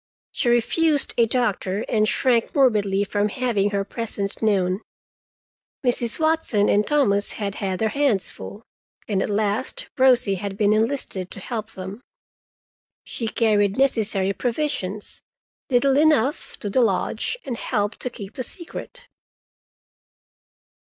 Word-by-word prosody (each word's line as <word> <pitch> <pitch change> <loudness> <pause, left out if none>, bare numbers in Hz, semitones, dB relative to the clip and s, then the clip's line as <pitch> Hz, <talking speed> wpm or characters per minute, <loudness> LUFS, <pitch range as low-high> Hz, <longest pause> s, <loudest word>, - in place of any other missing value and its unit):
She 240 - 0
refused 290 +6 +2
a 235 -1 +3
doctor, 210 -4 -1
and 215 -1 +2
shrank 240 -4 +1
morbidly 210 -8 +3
from 205 +1 0
having 220 -4 0
her 200 -1 -1
presence 205 -3 -3
known. 195 -3 +1 1.0
Mrs. 240 0 +2
Watson 315 -10 +2
and 210 +1 +2
Thomas 205 -9 +2
had 200 -2 -3
had 190 -2 -1
their 220 +2 0
hands 270 -7 +1
full, 210 +3 -10 0.4
and 195 -3 0
at - - -1
last 210 +4 -1
Rosie 250 -5 +5
had 200 -1 -4
been 210 0 +3
enlisted 215 -5 -1
to - - -9
help 220 +2 -5
them. 190 +4 -7 1.0
She 230 - -4
carried 210 -3 +2
necessary 210 -7 +2
provisions—little 245 +2 -2
enough—to 290 -6 +1
the 255 - +3
lodge, 220 - 0
and 255 - -3
helped 210 -2 -2
to 250 - -3
keep 205 -3 -9
the 255 - -4
secret. 440 - -7
220 Hz, 125 wpm, -23 LUFS, 200-255 Hz, 1.0 s, Rosie